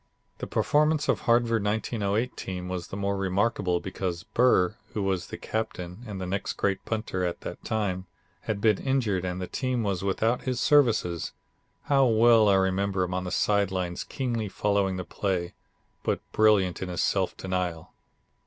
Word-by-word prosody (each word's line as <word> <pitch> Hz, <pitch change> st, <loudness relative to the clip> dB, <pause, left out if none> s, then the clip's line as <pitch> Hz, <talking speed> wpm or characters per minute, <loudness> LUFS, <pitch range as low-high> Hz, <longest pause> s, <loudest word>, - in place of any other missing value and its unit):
The -, -, -4 dB
performance 150 Hz, 0 st, +2 dB
of -, -, +2 dB
the -, -, -15 dB
Harvard 115 Hz, -2 st, +3 dB
1908 110 Hz, +2 st, -1 dB
team 90 Hz, -1 st, -5 dB
was 90 Hz, -2 st, -4 dB
the 95 Hz, -, -6 dB
more 100 Hz, 0 st, 0 dB
remarkable 95 Hz, -1 st, +1 dB
because 95 Hz, -1 st, -4 dB
Burr, 110 Hz, -4 st, +3 dB, 0.2 s
who 105 Hz, -, 0 dB
was 95 Hz, -2 st, -1 dB
the -, -, -7 dB
captain 90 Hz, -4 st, -4 dB
and 100 Hz, -3 st, -5 dB
the 95 Hz, +2 st, -2 dB
great 100 Hz, -1 st, 0 dB
punter 110 Hz, -5 st, -2 dB
at 90 Hz, -1 st, -2 dB
that -, -, -7 dB
time, 95 Hz, -4 st, -2 dB, 0.4 s
had 105 Hz, -2 st, -1 dB
been 110 Hz, -3 st, +3 dB
injured 120 Hz, -9 st, 0 dB
and 90 Hz, 0 st, -3 dB
the 90 Hz, -, -3 dB
team 125 Hz, +2 st, -1 dB
was 95 Hz, -3 st, -1 dB
without 110 Hz, +5 st, +1 dB
his 130 Hz, -2 st, -2 dB
services. 110 Hz, -, +3 dB, 0.5 s
How 135 Hz, -2 st, +4 dB
well 115 Hz, -1 st, +5 dB
I 100 Hz, -, +5 dB
remember 95 Hz, 0 st, +1 dB
him 90 Hz, 0 st, -3 dB
on 90 Hz, 0 st, -2 dB
the 90 Hz, -, -4 dB
side 100 Hz, -2 st, +2 dB
lines 90 Hz, -2 st, -3 dB
keenly 120 Hz, -5 st, -3 dB
following 100 Hz, -1 st, 0 dB
the 90 Hz, -, -4 dB
play, 90 Hz, -3 st, -2 dB, 0.5 s
but -, -, 0 dB
brilliant 105 Hz, -5 st, +3 dB
in 95 Hz, -, -3 dB
his 90 Hz, -, -1 dB
self -, -, 0 dB
denial. 90 Hz, -3 st, -3 dB
100 Hz, 170 wpm, -27 LUFS, 90-110 Hz, 0.5 s, well